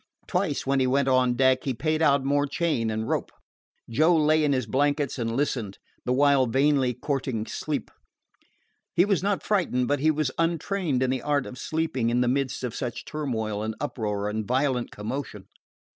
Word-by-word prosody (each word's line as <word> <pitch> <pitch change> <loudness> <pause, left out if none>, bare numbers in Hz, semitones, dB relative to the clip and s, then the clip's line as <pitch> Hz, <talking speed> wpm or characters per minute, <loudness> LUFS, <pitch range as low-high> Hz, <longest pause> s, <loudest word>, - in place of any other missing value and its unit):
Twice, - - -1
when 135 0 +2
he 130 - +2
went 135 +1 +2
on 130 -2 +3
deck, 130 0 +3
he 135 -3 -2
paid 155 +4 0
out 140 -3 +4
more 145 +1 +1
chain 140 -7 0
and 110 +1 -2
rope. - - -1 0.6
Joe 155 +9 +3
lay 155 0 +3
in 145 - +2
his 130 -3 0
blankets 140 +3 0
and 115 0 -2
listened, 120 -8 -1 0.3
the 125 - 0
while 140 0 +4
vainly 135 0 +2
courting 130 -5 -2
sleep. 145 -2 -4 1.0
He 175 - +5
was 200 -4 +1
not 200 0 0
frightened, 160 -12 +1
but 145 +1 +1
he 155 +3 +3
was 155 -3 0
untrained 165 -4 0
in 130 - +1
the 130 -1 -1
art 145 -2 0
of 125 - -9
sleeping 155 -7 -1
in 120 +1 +2
the 125 - +2
midst 130 0 -1
of 125 -2 -3
such 125 -3 -5
turmoil 110 -9 -3
and 110 0 -3
uproar 105 -8 -2
and 110 +1 -2
violent 130 +2 0
commotion. 105 -2 -6
135 Hz, 185 wpm, -26 LUFS, 120-150 Hz, 1.0 s, He